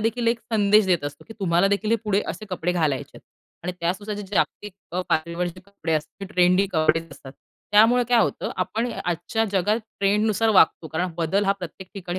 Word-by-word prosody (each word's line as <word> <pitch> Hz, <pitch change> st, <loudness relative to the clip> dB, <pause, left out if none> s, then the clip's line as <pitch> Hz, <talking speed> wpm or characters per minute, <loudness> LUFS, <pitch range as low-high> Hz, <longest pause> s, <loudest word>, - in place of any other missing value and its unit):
देखील 230 Hz, +2 st, -1 dB
एक 235 Hz, -, +1 dB
संदेश 210 Hz, -1 st, +4 dB
देत 175 Hz, -5 st, +1 dB
असतो, 145 Hz, 0 st, -7 dB
की -, -, -8 dB
तुम्हाला 175 Hz, +1 st, +3 dB
देखील 205 Hz, +2 st, 0 dB
हे 230 Hz, -, +4 dB
पुढे 205 Hz, -1 st, +1 dB
असे 215 Hz, -, -5 dB
कपडे 180 Hz, -1 st, -1 dB
घालायचे 155 Hz, -6 st, -1 dB
आहेत. -, -, -13 dB, 0.4 s
आणि 180 Hz, -, -2 dB
त्या 170 Hz, +1 st, +1 dB
नुसार 210 Hz, +1 st, -5 dB
जे 210 Hz, -, -5 dB
जागतिक 205 Hz, -2 st, -1 dB, 0.4 s
पातळीवरचे 170 Hz, +2 st, -1 dB
कपडे 200 Hz, -5 st, -4 dB
असतात 155 Hz, +6 st, -4 dB
ट्रेंडी 180 Hz, +2 st, +4 dB
कपडे 155 Hz, 0 st, +3 dB
असतात 135 Hz, -1 st, -12 dB, 0.4 s
त्यामुळं 225 Hz, +4 st, +6 dB
काय 240 Hz, -1 st, +4 dB
होतं -, -, -1 dB
आपण 215 Hz, +7 st, -1 dB
आजच्या 175 Hz, +6 st, -1 dB
जगात 205 Hz, +4 st, +2 dB, 0.2 s
ट्रेंडनुसार 210 Hz, +2 st, +2 dB
वागतो. 170 Hz, -5 st, +4 dB
कारण 170 Hz, +3 st, -2 dB
बदल 190 Hz, +5 st, +1 dB
हा 195 Hz, -, +3 dB
प्रत्येक 180 Hz, +1 st, -8 dB
ठिकाणी 185 Hz, -1 st, -5 dB
190 Hz, 185 wpm, -24 LUFS, 170-210 Hz, 0.4 s, त्यामुळं